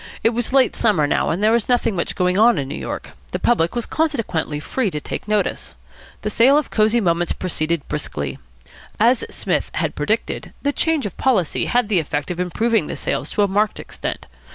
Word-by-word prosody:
It 225 - +4
was 240 +1 -2
late 265 -1 +4
summer 200 -10 +3
now, 145 - +1
and 180 +5 -1
there 215 - +5
was 230 0 +1
nothing 240 -4 +2
much 170 - -2
going 180 -1 +1
on 225 +2 +5
in 140 -2 -2
New - - -5
York. - - -5 0.2
The - - +1
public 170 -7 +1
was 240 - -1
consequently 230 - -1
free 225 - -1
to 150 - -3
take 150 - -6
notice. 210 -1 -1 0.5
The 210 - -1
sale 255 +7 +5
of 300 - -1
Cosy 220 +2 +3
Moments 175 -4 +1
proceeded 165 -3 -2
briskly. 70 - -4 0.6
As 235 +2 +4
Psmith - - -1
had - - -1
predicted, - - -2
the 285 0 +1
change 320 -5 0
of 200 - -5
policy 215 - +1
had 245 -2 +1
the 200 -4 +2
effect 145 0 -3
of 175 - -5
improving 225 +6 +1
the - - -4
sales - - -2
to 205 - +2
a - - +3
marked 205 +2 0
extent. - - -6
210 Hz, 200 wpm, -21 LUFS, 170-240 Hz, 0.6 s, there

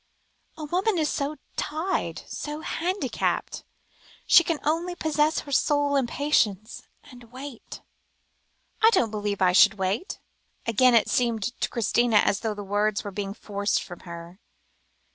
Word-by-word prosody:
"A 315 - -7
woman 365 +6 0
is 310 -2 +1
so 285 +2 -2 0.2
tied, 320 +6 -2
so 300 +1 -6
handicapped; 360 +5 -2 0.6
she 340 - +7
can 330 -1 -1
only 335 +4 -1
possess 310 -1 +1
her 285 - -11
soul 290 +1 +2
in 270 -3 +2
patience, 230 -7 0 0.2
and 245 -4 -14
wait." 260 -1 -9 1.0
"I 445 - +7
don't 235 - +2
believe 205 -2 -2
I 180 - +5
should 180 - +6
wait," 200 - -2 0.5
again 240 +2 +4
it 230 - +4
seemed 235 -4 0 0.2
to - - 0
Christina, 235 0 +1
as 200 - +3
though 220 -2 -3
the 205 - -6
words 205 +1 0
were 205 - -6
being 195 0 -5
forced 205 -1 -1
from 175 -2 -10
her. 170 +1 -10
245 Hz, 145 wpm, -25 LUFS, 205-300 Hz, 1.0 s, she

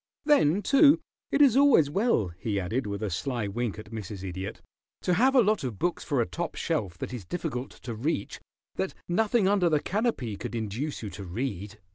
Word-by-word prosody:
Then, 205 - +4
too, 285 - +6 0.3
it 290 - +5
is 260 -5 +5
always 275 - +6
well," 165 - +1
he 100 +4 -3
added, 110 +7 -2
with 100 +1 -4
a 105 - -2
sly 120 +3 -2
wink 115 +1 -3
at 110 0 -10
Mrs. 105 -3 -6
Idiot, 95 +2 -5 0.4
"to 180 - +2
have 260 +8 +3
a 250 - +7
lot 215 -3 +1
of 120 -6 -4
books 175 - -1
for 140 -4 0
a 120 - +3
top 170 +4 -4
shelf 105 - -2
that 115 - -5
is 120 -5 -5
difficult 135 - -4
to 120 - -8
reach 115 0 -2 0.4
that 190 - -2
nothing 210 +3 +2
under 195 -3 +3
the 155 -2 +3
canopy 185 - -1
could 120 - -5
induce 115 +6 -3
you 105 - -5
to 90 +3 -8
read. 105 +1 -4
130 Hz, 200 wpm, -28 LUFS, -, 0.4 s, a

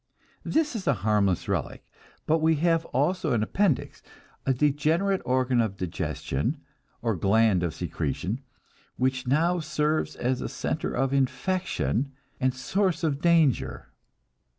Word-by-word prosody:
This 305 -4 0
is 195 -5 -4
a 140 - +4
harmless 100 -4 +2
relic. - - -3 0.4
But 160 +1 +2
we 160 0 +3
have 165 +1 +2
also 155 +2 0
an 110 -2 +2
appendix, 185 - 0 0.5
a - - +4
degenerate 155 +8 +1
organ 125 -1 +2
of 105 -4 -2
digestion, 90 - -2 0.4
or 115 -3 +1
gland 100 +1 +3
of 85 -3 -2
secretion, 110 +8 -3 0.6
which 130 0 0
now 165 +7 +2
serves 155 0 -1
as 125 +1 -1
a - - -3
center - - -2
of 135 +2 0
infection 140 - 0 0.3
and 130 0 +2
source 180 +6 -1
of 145 -3 0
danger. 165 -6 +2
140 Hz, 130 wpm, -27 LUFS, 120-165 Hz, 0.6 s, a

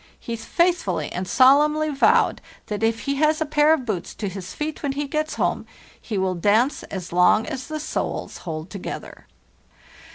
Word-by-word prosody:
He 235 - -5
faithfully 340 - 0
and 185 +1 -4
solemnly 300 +6 +4
vowed 280 -2 +3 0.2
that 210 0 -4
if 225 0 +1
he 280 -1 -2
has 310 +2 +2
a 315 - 0
pair 300 +1 +3
of 305 -6 +2
boots 195 -7 -4
to 205 - -3
his 185 -1 -7
feet 305 0 -4
when 280 -2 -1
he 290 +1 -2
gets 310 +2 -2
home - - -1 0.3
he 215 - -4
will 190 -1 +1
dance 210 - +2
as 185 -3 -7
long 180 +5 +4
as 260 -1 -5
the 310 0 -4
soles 305 - -4
hold 160 0 -6
together. 200 -3 -7
255 Hz, 180 wpm, -23 LUFS, 195-300 Hz, 0.3 s, solemnly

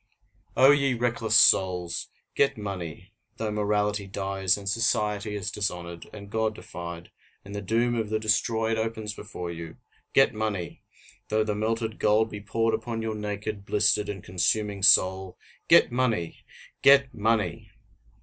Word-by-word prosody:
O 135 +3 +7
ye 140 -3 +2
reckless 115 -2 0
souls! 90 -5 +3 0.3
get 140 - +2
money 95 -2 -7 0.2
though 110 -1 -2
morality 105 -1 0
dies, 95 -1 -1
and 100 -1 -9
society 105 -1 0
is 105 +1 -4
dishonored, 85 -5 -4
and 100 -1 -11
God 110 -1 0
defied, 85 -2 -8 0.3
and 100 - -9
the 105 - -4
doom 115 +4 +1
of 110 -3 -2
the 110 - 0
destroyed 110 +1 0
opens 110 -1 -3
before 90 -5 -7
you 85 -1 -8 0.4
get 135 - +4
money! 105 -5 -4 0.5
Though 110 0 +1
the 105 -1 -2
melted 110 +1 -2
gold 110 +1 +2
be 105 - -7
poured 115 +2 0
upon 115 -2 -3
your 110 -1 -2
naked, 105 -1 -5
blistered, 105 +1 +1
and 95 -3 -6
consuming 100 +3 -1
soul 95 -1 +4 0.3
get - - +6
money! 115 -9 -1 0.4
Get 140 -1 +5
money! 105 -5 -1
105 Hz, 145 wpm, -26 LUFS, 95-110 Hz, 0.5 s, O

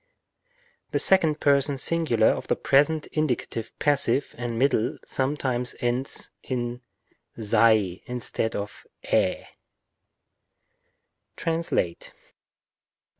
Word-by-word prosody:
The - - 0
second 160 -6 +3
person 140 0 +3
singular 135 -8 +2
of - - -2
the - - +2
present 150 +3 +2
indicative 125 -6 -2
passive 140 -2 +1
and 120 -1 -4
middle 125 -2 +1
sometimes 130 -3 -2
ends 125 +2 -2
in 120 -1 -4 0.6
σαι 105 -4 +3
instead 120 -2 -3
of 100 0 -6 0.2
ἢ, - - +1 1.9
TRANSLATE 165 - -2
1. - - -33
125 Hz, 90 wpm, -25 LUFS, 115-145 Hz, 1.9 s, second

